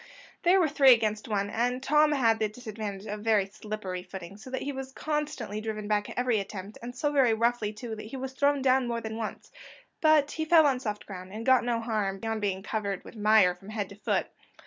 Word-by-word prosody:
There 365 +2 +5
were 340 - +4
three 275 -3 +7
against 215 -2 -1
one, 205 -2 -1
and 245 +3 -1
Tom 300 +2 +4
had 230 -5 +3
the 215 -1 +1
disadvantage 215 -3 -6
of 210 0 -5
very 215 -3 +3
slippery 195 -2 -6
footing, 185 0 -9
so 215 +5 -11
that 260 - -3
he 285 - -2
was 265 -1 -6
constantly 290 -8 -3
driven 215 -1 -4
back 205 -1 0
at - - -9
every 245 -3 +2
attempt, 200 +1 -7
and 245 +1 -7
so 290 +3 0
very 260 -6 +4
roughly 230 -2 +1
too, 220 +1 -6
that 215 0 -8
he 265 - -7
was 260 0 -5
thrown 280 +1 +2
down 260 -1 +3
more 235 -1 -1
than 220 -1 -5
once; 220 -2 -6 0.5
but 310 -2 +4
he 315 - -2
fell 315 0 +6
on 270 -3 +2
soft 210 -4 -4
ground, 185 -1 -9
and 220 +3 -6
got 260 -1 +5
no 235 -1 0
harm 215 -4 -1
beyond 225 +1 -3
being 195 -2 -1
covered 200 -3 -3
with - - -12
mire 210 -3 +5
from 190 +3 -14
head 215 -3 -3
to 200 - -11
foot. 210 - 0
220 Hz, 230 wpm, -28 LUFS, 210-260 Hz, 0.5 s, three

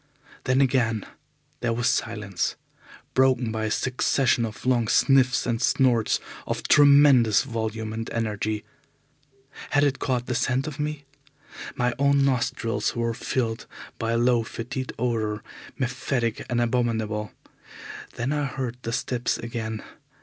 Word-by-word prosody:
Then 130 +2 +3
again 120 -5 +1 0.5
there 120 -1 0
was 120 +1 0
silence, 105 -6 -1 0.6
broken 130 -3 +3
by 110 0 -2
a - - -1
succession 125 0 +1
of 110 +1 -8
long 120 -3 +2
sniffs 130 +1 +3
and 115 -1 -1
snorts 120 -5 +2 0.3
of - - -3
tremendous 140 -6 +6
volume 110 -3 -4
and 115 +1 -4
energy. 110 -1 -2 1.0
Had 145 0 +3
it 140 -2 +1
caught 125 -3 -1
the 125 - -2
scent 125 +2 0
of 150 -2 -6
me? 150 -1 -3 0.7
My 125 0 +1
own 140 0 +4
nostrils 115 -4 0
were 115 -1 0
filled 115 -1 -2 0.3
by 115 0 -1
a - - +2
low 120 0 +3
fetid 125 +3 -5
odour, 110 -3 -1 0.3
mephitic 130 -3 -2
and 120 -1 0
abominable. 110 -3 0 0.8
Then 125 +3 -2
I 150 -1 0
heard 130 -3 -4
the 115 - -4
steps 125 -1 -1
again. 110 -2 -5
120 Hz, 135 wpm, -25 LUFS, 115-130 Hz, 1.0 s, tremendous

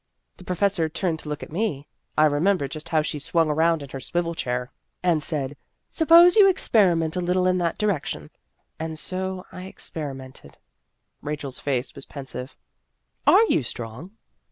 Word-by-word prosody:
The - - -13
pro 180 0 -3
fessor 180 -4 +1
turned 165 0 -1
to 150 - -8
look 150 - -4
at - - -10
me 160 -6 -2 0.3
I 155 - +6
remem 165 +7 +2
ber 140 - -3
just 155 +2 -8
how 155 -2 +2
she 150 -1 -3
swung 160 +2 +1
around 160 0 +2
in 140 - -10
her 135 - -6
swivel 170 +5 -2
chair 125 -4 -3 0.3
and 170 -4 +2
said, 145 -2 -2 0.3
'Suppose 335 +2 +7
you 405 -3 +8
experiment 180 - +3
a 180 - 0
little 180 +1 +1
in 185 0 +2
that 170 -2 -1
direction.' 150 - -2 0.5
And 160 0 -4
so 185 +2 -4
I 185 - -8
experimented." 135 -8 -8 0.6
Rachel's 145 -3 -5
face 135 -3 -2
was 140 - -11
pensive. 135 -1 -7 0.4
" - - -44
Are 455 - +7
you 425 - +2
strong?" 120 - -7
160 Hz, 175 wpm, -24 LUFS, 140-185 Hz, 0.6 s, you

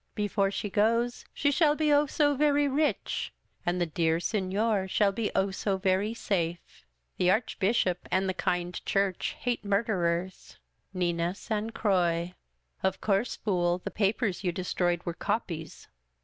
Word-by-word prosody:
Before 205 -2 +1
she 200 - -3
goes, 230 +3 +1
she 285 - +1
shall 295 0 +3
be, 305 -1 +2
Oh 290 +1 +4
so 290 0 +2
very 290 0 +3
rich! 290 +3 0 0.4
and 175 +1 +1
the 175 - +2
dear 165 0 +1
Seiior 195 +2 0
shall 200 +1 +3
be, 210 +1 -2
Oh 195 0 +2
so 195 0 -1
very 190 +3 +1
safe! 175 -6 -3 0.3
The 180 - +3
Archbishop 195 -3 +1
and 190 +1 +1
the 190 - 0
kind 180 -1 -2
Church 195 -2 0
hate 245 -3 -1
murderers. 190 -4 -1 0.2
" - - -46
Nina 175 -1 -1
San 215 +1 -3
Croix. 180 -5 +1 0.3
" - - -43
Of 190 0 0
course, 205 +3 0
fool, 175 -4 0
the 180 - -6
papers 205 -1 0
you 180 - +1
destroyed 175 -1 -1
were 170 - -2
copies. 165 -5 -4
195 Hz, 155 wpm, -29 LUFS, 175-225 Hz, 0.4 s, Oh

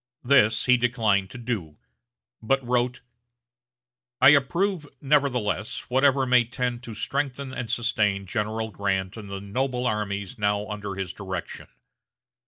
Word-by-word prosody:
This 120 -5 +4
he 125 -1 +5
declined 110 -6 +1
to 125 - -9
do, 105 -11 -4 0.6
but 135 +3 +1
wrote: 125 0 0 1.2
"I 130 - +8
approve, 160 +4 +2
nevertheless, 130 -7 0
whatever 135 +1 +4
may 125 -1 +5
tend 120 0 -3
to 115 - -7
strengthen 140 +2 -3
and 125 -3 -4
sustain 105 -4 +1
General 110 +2 -2
Grant 95 0 -2
and 105 -3 -9
the 100 0 -5
noble 125 +5 -2
armies 100 -3 -2
now 105 0 0
under 105 -2 -5
his 95 -4 -4
direction. 95 -3 -6
120 Hz, 130 wpm, -25 LUFS, 105-130 Hz, 1.2 s, I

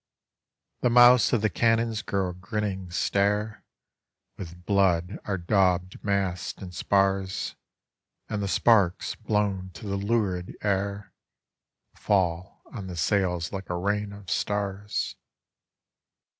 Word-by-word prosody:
The 125 - +2
mouths 120 -1 +7
of 115 -3 +1
the 110 - +3
cannons 115 -1 +1
grow 95 -5 -1
a - - -5
grinning 95 0 -4
stare, 105 +4 0 0.7
With 90 -1 -10
"blood 95 -2 +2
are 100 -2 -1
daubed 90 0 +1
masts 95 -6 -1
and 90 -2 -8
spars, 95 0 0 0.7
And 105 -2 -3
the 100 - -1
sparks 100 -3 +3
blown 105 -4 -1
to 105 - -9
the 100 -1 -2
lurid 100 -4 -1
air 100 0 -1 0.8
Pall 90 -2 -1
on 100 -6 -6
the 90 -2 -7
sails 90 -1 0
like 95 0 -6
a 90 - -1
rain 100 +2 -1
of 100 0 -11
starB. 105 +1 -2
100 Hz, 120 wpm, -26 LUFS, 90-105 Hz, 0.8 s, mouths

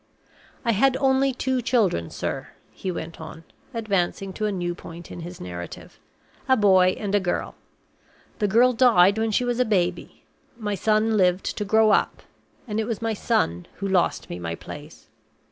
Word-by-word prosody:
"I 230 - +3
had 260 +5 +3
only 270 0 +3
two 260 0 -1
children, 210 - +1
sir," - - -4 0.2
he 185 - -4
went 165 -1 -7
on, 160 +1 -9 0.3
advancing 195 -4 -1
to 215 +1 -2
a - - -1
new 175 -2 -2
point 170 0 -11
in - - -7
his 175 +1 -8
narrative, 90 -1 -8 0.5
"a 260 - +5
boy 190 -3 +5
and 205 -2 -4
a 205 - +4
girl. 180 -2 -2 0.9
The 210 - +2
girl 240 +5 +4
died 220 -5 +5
when 225 0 +1
she 230 +3 +1
was 245 0 -1
a - - +5
baby. 180 -6 -1 0.3
My 210 -3 -3
son 215 +2 +2
lived 180 -1 +1
to 210 - -3
grow 220 +1 +4
up; - - +1 0.4
and 210 -1 -2
it 220 - 0
was 225 -2 -3
my 225 -1 -1
son 90 - 0
who 195 - -4
lost 190 -2 +1
me 85 - -6
my 85 -1 -4
place. - - -11
205 Hz, 180 wpm, -24 LUFS, 175-225 Hz, 0.9 s, a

